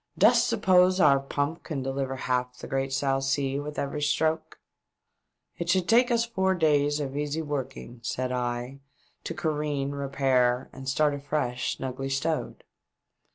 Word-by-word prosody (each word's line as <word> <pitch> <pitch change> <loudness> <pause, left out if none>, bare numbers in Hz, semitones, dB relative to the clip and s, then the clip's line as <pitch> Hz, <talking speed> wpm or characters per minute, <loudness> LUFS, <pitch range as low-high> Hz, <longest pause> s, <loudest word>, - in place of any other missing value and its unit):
" - - -37
Dost - - +5
suppose 185 0 +4
our 140 -6 +6
pump 145 +4 -2
can 140 -5 -4
deliver 135 0 -2
half 125 -1 -2
the - - -8
great 135 0 -2
South 135 0 0
Sea 135 0 0
with 150 +1 -6
every 140 +1 -2
stroke 155 +2 0 0.5
?" - - -50
"It 170 0 -3
should 185 0 +2
take 245 +3 +5
us 235 -1 +2
four 190 -5 0
days 145 -3 +2
of 140 -2 -4
easy 150 +2 -2
working," 135 -4 -5
said 125 +1 -2
I, 125 +1 -3 0.2
" - - -38
to 165 - -4
careen, 150 -3 -1
repair 135 -3 +1
and 135 0 -6
start 150 +1 +2
afresh 140 -3 -2
snugly 135 +1 -4
stowed." 150 +4 -2
140 Hz, 160 wpm, -27 LUFS, 135-155 Hz, 0.5 s, our